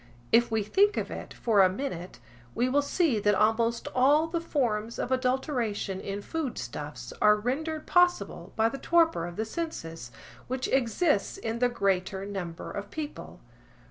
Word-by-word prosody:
If 235 +1 +5
we 220 -2 0
think 405 - +3
of - - -2
it - - -7
for 215 -4 +2
a 185 - +6
minute, 185 -5 -5 0.4
we 245 - +2
will 280 +3 +3
see 285 - +1
that 205 0 +3
almost 230 +3 +1
all 285 +5 +4
the 330 +1 -2
forms 235 -8 -1
of 250 - -3
adulteration 250 -6 -1
in 200 +1 -5
food 315 -3 -3
stuffs 145 +4 -6
are 210 0 +7
rendered 305 +8 -2
possible 280 - +2
by 225 0 +3
the 275 +4 -4
torpor 330 - +2
of 175 - -8
the 220 - -2
senses, 165 - -5 0.4
which 255 +1 -2
exists 260 - +1
in 230 +1 -3
the 245 0 +3
greater 195 -3 0
number 185 -5 -5
of 200 0 -6
people. 305 +2 -7
230 Hz, 165 wpm, -28 LUFS, 200-285 Hz, 0.4 s, are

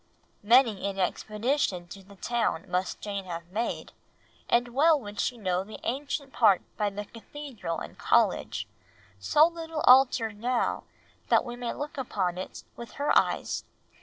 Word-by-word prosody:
Many 225 -3 +4
an 195 -1 -4
expedition 210 0 -1
to 195 - -10
the 200 +1 -16
town 235 0 -1
must 180 +1 -2
Jane 200 -2 -4
have 170 -2 -6
made, 225 +4 -3 0.6
and 240 0 +3
well 300 +5 +4
would 205 -4 -9
she 245 - 0
know 185 -4 -1
the 215 +2 -10
ancient 275 +2 -3
part 205 -6 +4
by 210 -1 0
the 205 +1 -6
Cathedral 230 - -7
and - - -8
College, - - +2 0.5
so 295 - +5
little 325 -2 -4
altered 245 -5 +5
now 245 +2 0 0.4
that - - +4
we 240 -1 -5
may 245 -1 -3
look 290 0 -5
upon 185 -8 -1
it 185 - -7
with 235 - -9
her 285 +1 +1
eyes. - - +1
225 Hz, 155 wpm, -28 LUFS, 195-265 Hz, 0.6 s, so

